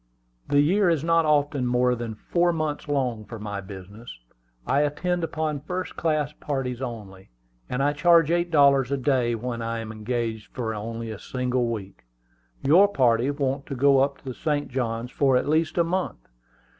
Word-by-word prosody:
The 145 0 +4
year 185 +5 +3
is 160 -4 +1
not 165 0 +3
often 145 -3 +2
more 125 0 +2
than 115 -2 -4
four 175 +10 +1
months 155 -3 -3
long 130 -6 -1
for 110 +3 -9
my 105 -2 -5
business. 100 +4 -11 0.6
I 140 - +2
attend 170 +4 -1
upon 155 -2 -2
first 180 +4 -5
class 155 -3 0
parties 135 -4 -4
only, 105 -7 -7 0.4
and 125 +2 -1
I 145 +1 +2
charge 165 +1 +4
eight 175 0 +1
dollars 140 -4 +4
a 140 - +1
day 125 -3 +1
when 120 +1 -4
I 115 0 -2
am 110 -1 -5
engaged 110 0 -4
for 115 -3 -2
only 115 +1 -5
a 105 - -7
single 125 -1 -1
week. 105 -4 -6 0.6
Your 175 +9 +6
party 125 - +2
want 140 -1 -2
to 135 - -4
go 140 +1 +4
up 140 0 +1
the 130 - -5
St. 145 +2 -2
Johns 120 -2 -3
for 135 -3 +3
at 125 - -1
least 155 +2 +1
a 170 - +5
month. 170 - -3
135 Hz, 180 wpm, -25 LUFS, 115-150 Hz, 0.6 s, Your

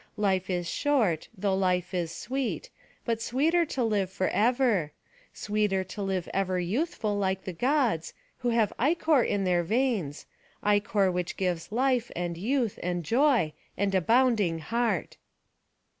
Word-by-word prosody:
Life 190 -2 +1
is 175 -2 -1
short, 225 - +1
though 195 0 0
life 185 -1 0
is 170 -3 -1
sweet; 265 - -3 0.3
but 230 -2 -1
sweeter 315 +9 +2
to 260 - -1
live 205 -4 +1
forever; 205 - +1 0.4
sweeter 210 -2 0
to 185 +3 -8
live 190 -3 -2
ever 190 -1 0
youthful 215 - -1
like 190 -1 -1
the 185 - -5
Gods, 240 - 0 0.2
who 245 -2 0
have 230 -3 +2
ichor 310 +1 +3
in 205 -3 0
their 180 -2 +2
veins; 215 - -1 0.4
ichor 205 -2 +2
which 180 -1 -3
gives 180 -1 -2
life, 250 0 +1
and 175 -1 -2
youth, 230 +4 -1
and 175 0 -2
joy, 240 - +3 0.2
and 200 -1 0
a 190 - +3
bounding 225 -5 +3
heart." 225 +2 -1
205 Hz, 145 wpm, -28 LUFS, 180-245 Hz, 0.4 s, ichor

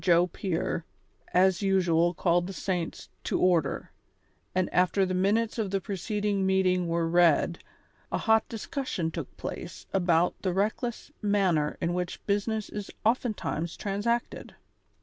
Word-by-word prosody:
Joe 175 -1 +5
Pier, 175 -2 -2 0.5
as 185 +1 +4
usual 175 -3 +2
called 175 0 +2
the 195 - -6
saints 180 -3 -3 0.2
to - - 0
order, 175 -3 +1 0.6
and 185 -1 +2
after 185 +2 +3
the 185 - -2
minutes 215 +5 +1
of 210 -3 0
the 195 0 0
preceding 205 +1 -1
meeting 185 -2 +2
were 165 0 0
read, 170 0 +3 0.5
a - - +1
hot 220 -1 +2
discussion 225 - -3
took - - -7
place - - -6
about 175 -2 +3
the 185 -2 0
reclcless 220 +6 -1
manner 190 -8 +1
in 170 +1 0
which 180 0 -4
business 210 +1 0
is 205 -1 -6 0.2
oftentimes 215 -8 0
transacted. 210 +4 -2
185 Hz, 135 wpm, -28 LUFS, 175-205 Hz, 0.6 s, Joe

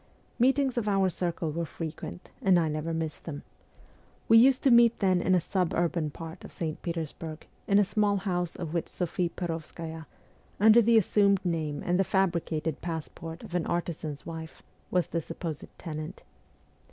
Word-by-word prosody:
Meetings 265 0 +3
of 215 - -4
our 195 -2 +3
circle 170 -2 -2
were 170 +3 -2
frequent, 165 +3 -7
and 190 -2 +5
I 165 - +1
never 155 +2 -2
missed 160 -2 -4
them. 145 -3 -6 0.8
We 225 0 +8
used 260 +2 +5
to 270 - +5
meet 235 -1 +6
then 185 -3 +2
in 185 +1 +3
a - - +4
suburban 170 -3 0
part 165 +3 -9
of - - -10
St. 160 -2 -4
Petersburg, 165 -1 -5 0.2
in 200 - +4
a 205 - +6
small 205 0 +2
house 180 -3 -2
of 165 -3 -5
which 170 - -1
Sophie 175 0 -1
Perovskaya, 165 -1 -5 0.5
under 220 +3 +7
the 230 +1 +5
assumed 200 -2 +3
name 155 -4 -1
and 180 +1 +2
the - - +5
fabricated 170 -5 0
passport 165 0 -6
of - - -10
an 175 -2 0
artisan's 160 -4 -3
wife, 160 -1 -8 0.3
was 180 -1 +2
the 170 - -2
sup 165 - -9
posed 160 -5 -4
tenant. 155 +1 -6
170 Hz, 170 wpm, -29 LUFS, 160-195 Hz, 0.8 s, We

